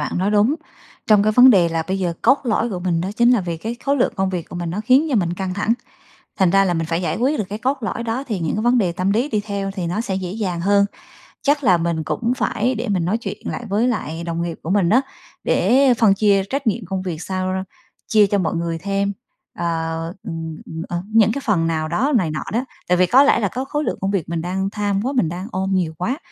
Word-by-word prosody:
bạn 150 - -2
nói 195 +3 +1
đúng. 210 +7 +3 0.5
Trong 210 -2 +5
cái 215 +1 +2
vấn 250 +3 +8
đề 180 -7 +5
là 165 -1 -1
bây 190 +1 -1
giờ, 175 -3 -1
cốt 270 +4 +5
lõi 230 0 0
của 185 - -3
mình 175 -2 0
đó 185 - -2
chính 240 +1 +5
là 245 -5 +4
vì 170 -2 -4
cái 225 +8 -5
khối 280 +1 +2
lượng 250 - +1
công 190 0 0
việc 175 -3 -4
của 175 - -7
mình 170 -1 -3
nó 200 +5 -3
khiến 265 +5 +4
cho - - +1
mình 175 -3 +1
căng 185 -1 -3
thẳng. 210 +3 +1 0.7
Thành 190 -3 +4
ra 195 +2 +4
là 175 - +1
mình 165 -1 -1
phải 165 +1 -1
giải 175 - -1
quyết 270 +5 +1
được - - +1
cái 210 - -4
cốt 265 +3 0
lõi 235 +2 -3
đó 235 +4 -2
thì 210 -6 -2
những 165 +3 -1
cái 215 - -1
vấn 245 +1 +4
đề 185 -6 +2
tâm 185 +3 -1
lý 245 +8 +1
đi 210 - 0
theo 200 -1 -3
thì 185 -4 -4
nó 180 +6 -1
sẽ 195 -5 -3
dễ 185 -2 -4
dàng 185 -5 -3
hơn. 200 +1 +4 0.6
Chắc 290 0 +1
là 185 -7 +5
mình 165 -1 -1
cũng 235 +8 -1
phải 245 +2 0
để 235 +2 -3
mình 180 -4 0
nói 210 +6 +1
chuyện 235 - -6
lại 240 - -4
với 220 +5 +2
lại 170 -8 -3
đồng 170 0 -3
nghiệp 170 -1 -4
của 165 - -5
mình 190 -3 +2
á, 255 +4 +5 0.4
để 255 +7 +4
phân 215 -4 +5
chia 200 -1 +3
trách 275 -2 -2
nhiệm 215 -1 0
công 190 +1 -3
việc 175 -3 -5
sao 185 -1 -2
ra 190 0 -2 0.4
chia 210 -2 +5
cho 205 - +1
mọi 175 -2 -1
người 165 0 -2
thêm, 200 +1 -1 0.5
ờ, 170 - -1 0.6
ừm, 160 -1 -5
ừm, 160 0 -6
ờ, 175 +1 -3
những 220 -1 +5
cái 280 - -3
phần 170 -7 +2
nào 155 -1 -1
đó 255 - 0
này 170 -6 0
nọ 155 - -3
đó. 245 +4 0 0.2
Tại 180 0 +3
vì 185 - +5
có 260 +8 +6
lẽ 285 - +4
là 205 - +1
có 260 +7 -4
khối 295 +2 -2
lượng - - -2
công 195 +1 0
việc 180 -5 -2
mình 165 -1 -2
đang 190 +3 -2
tham 205 -1 -1
quá, 260 +5 -2
mình 240 - +1
đang 180 +4 -5
ôm 190 +1 -2
nhiều 170 -4 0
quá. 245 +11 -1
195 Hz, 275 wpm, -20 LUFS, 175-230 Hz, 0.7 s, vấn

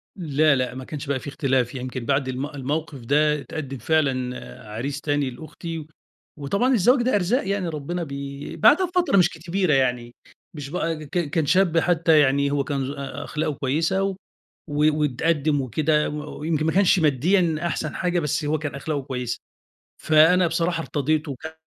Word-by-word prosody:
لأ 155 -4 +2
لأ، 125 -1 -2
ما 130 - -6
كانش 150 0 -7
بقى 140 -1 0
في - - -10
اختلاف، 130 -3 0
يمكن 130 -1 -5
بعد 135 -1 +1
الم 130 +1 -3
الموقف 145 0 -4
ده 150 +2 +3
اتقدم 140 -3 -6
فعلًا 125 - -2
عريس 135 +7 -4
تاني 145 -2 0
لأختي، 160 +4 -7 0.5
وطبعًا 200 - +1
الزواج 245 +4 +4
ده 250 0 +1
أرزاق 205 +4 +1
يعني، 200 -2 -1
ربنا 165 +3 -4
بي 140 -1 -6
بعدها 300 - +5
بفترة 355 - +1
مش 175 -2 +5
كبيرة 170 +1 -1
يعني، 125 -3 0 0.4
مش 145 -3 -7
بقى 165 -1 -2
ك - - -15 0.2
كان 155 +1 0
شاب 180 +2 +3
حتى 165 -2 +4
يعني، 140 0 +3
هو 140 -1 +1
كان 140 -1 -2
ذو 135 +2 -4
أ 140 -1 -6
أخلاقه 150 0 -2
كويسة 160 +8 0
و 195 -1 -1 0.5
و 150 +1 +2
واتقدم 150 +1 +1
وكده، 150 +5 +1
و 150 0 -7
ويمكن 155 0 -1
ما 160 - +2
كانش 190 0 +4
ماديًا 160 +4 +2
أحسن 155 -3 -3
حاجة، 180 -1 0
بس 150 -1 -1
هو 150 +2 +1
كان 145 -2 -4
أخلاقه 145 +1 -3
كويسة، 125 -2 -4 0.6
فأنا 165 +3 +5
بصراحة 165 0 0
ارتضيته 150 0 -1
وكان 160 +5 -8
150 Hz, 170 wpm, -23 LUFS, 140-165 Hz, 0.6 s, بعدها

